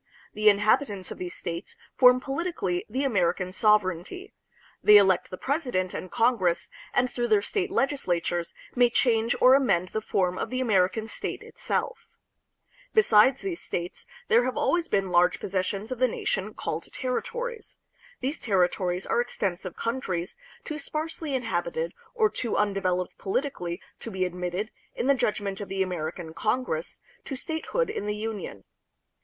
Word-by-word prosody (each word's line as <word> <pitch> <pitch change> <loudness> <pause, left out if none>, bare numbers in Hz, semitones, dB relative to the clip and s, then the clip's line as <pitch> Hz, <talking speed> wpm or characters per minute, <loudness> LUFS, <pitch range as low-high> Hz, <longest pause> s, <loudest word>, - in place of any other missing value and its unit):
The 215 0 +5
inhabitants 205 -1 +2
of - - -7
these 180 -1 -5
states 170 +2 -5 0.2
form 250 -1 +7
politically 270 - -2
the 260 +6 -1
American 185 -7 +1
sovereignty. 210 - +1 0.5
They 210 0 +9
elect 190 -3 +4
the 185 - -6
president 250 - -1
and 185 - -5
Congress, 200 -8 +2 0.2
and 250 - +2
through 240 -1 -2
their 210 -3 +3
state 400 - -1
legislatures 175 - 0 0.2
may 245 -1 +5
change 230 -1 +2
or 255 +1 +7
amend 195 -10 +3
the 220 - -2
form 185 -3 0
of - - -2
the 255 - -2
American 215 -3 +2
state - - -4
itself. - - -3 0.9
Besides 265 - +5
these 365 -3 -3
states, 175 0 -5 0.2
there 470 +2 +5
have - - -2
always 340 -1 +1
been 195 -2 +1
large 180 +1 +4
pos - - -6
sessions 195 +4 -2
of 255 - -3
the 255 - +5
nation - - -2
called - - -4
territories. 470 - -4 0.4
These 275 +5 -2
territories 180 -2 +1
are 240 - +2
extensive 190 -6 -3
countries, 190 -8 -3 0.3
too 305 -1 -4
sparsely 310 0 -3
inhabited 175 -8 -2 0.2
or 440 -2 +4
too 235 - -2
un 210 -1 +2
developed 185 -2 -1
politically 190 -6 -2 0.2
to - - -6
be 190 -3 -1
admitted, 180 +4 -3 0.2
in - - -2
the 280 - +5
judgment 205 -5 -1
of 200 - -6
the 195 0 +1
American 170 -2 -4
Congress, 210 -4 -2 0.2
to 275 - -4
statehood 320 - -2
in 205 - -4
the 210 - -1
Union. 210 - -5
210 Hz, 155 wpm, -27 LUFS, 180-260 Hz, 0.9 s, They